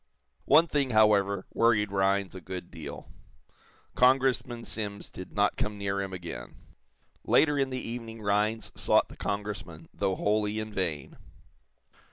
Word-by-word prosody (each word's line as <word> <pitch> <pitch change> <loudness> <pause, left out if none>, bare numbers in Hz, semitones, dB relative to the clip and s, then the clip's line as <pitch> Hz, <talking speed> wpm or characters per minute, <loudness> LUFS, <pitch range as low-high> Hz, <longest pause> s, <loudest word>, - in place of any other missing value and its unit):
One 165 - +6
thing, 145 -5 0
however, 100 -3 +3
worried 105 -3 +3
Rhinds 100 -1 +1
a 95 - -8
good 90 +1 -7
deal. - - -9 0.8
Congressman 125 -2 +2
Simms 100 -2 -5
did 95 - -9
not 105 0 +1
come 105 0 -2
near 100 -1 -1
him 95 -1 -4
again. 90 -2 -7 0.7
Later 150 -2 +4
in 135 -1 +1
the 130 -1 -4
evening 115 -1 -6
Rhinds 105 +2 0
sought - - +2
the - - -11
Congressman, 100 -6 -5
though 95 -2 0
wholly 105 +1 0
in 110 0 -5
vain. 80 -8 -3
105 Hz, 140 wpm, -28 LUFS, 100-115 Hz, 0.8 s, One